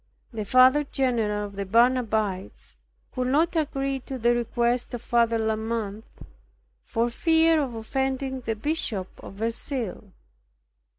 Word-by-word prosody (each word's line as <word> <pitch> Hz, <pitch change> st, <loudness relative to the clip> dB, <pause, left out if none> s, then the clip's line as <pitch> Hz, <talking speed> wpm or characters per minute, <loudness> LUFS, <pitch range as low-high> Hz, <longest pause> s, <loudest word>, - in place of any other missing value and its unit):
The 215 Hz, -2 st, -4 dB
Father 255 Hz, +6 st, +5 dB
general 230 Hz, -7 st, 0 dB
of 200 Hz, -1 st, -10 dB
the 200 Hz, -, -3 dB
Barnabites 220 Hz, -3 st, 0 dB, 0.4 s
would 255 Hz, -1 st, -1 dB
not 320 Hz, +6 st, +2 dB
agree 275 Hz, -3 st, -1 dB
to 265 Hz, +1 st, -7 dB
the 240 Hz, 0 st, +3 dB
request 240 Hz, +1 st, 0 dB
of 235 Hz, -, -7 dB
Father 230 Hz, -1 st, +2 dB
de 220 Hz, -, -1 dB
la 220 Hz, 0 st, +1 dB
Mothe, 220 Hz, -2 st, -3 dB, 0.8 s
for 230 Hz, -1 st, 0 dB
fear 325 Hz, +3 st, +3 dB
of 255 Hz, -5 st, -3 dB
offending 265 Hz, +3 st, -2 dB
the 225 Hz, -2 st, -2 dB
Bishop 220 Hz, -, -2 dB
of -, -, -10 dB
Verceil. 230 Hz, +1 st, -4 dB
240 Hz, 135 wpm, -25 LUFS, 220-265 Hz, 0.8 s, Father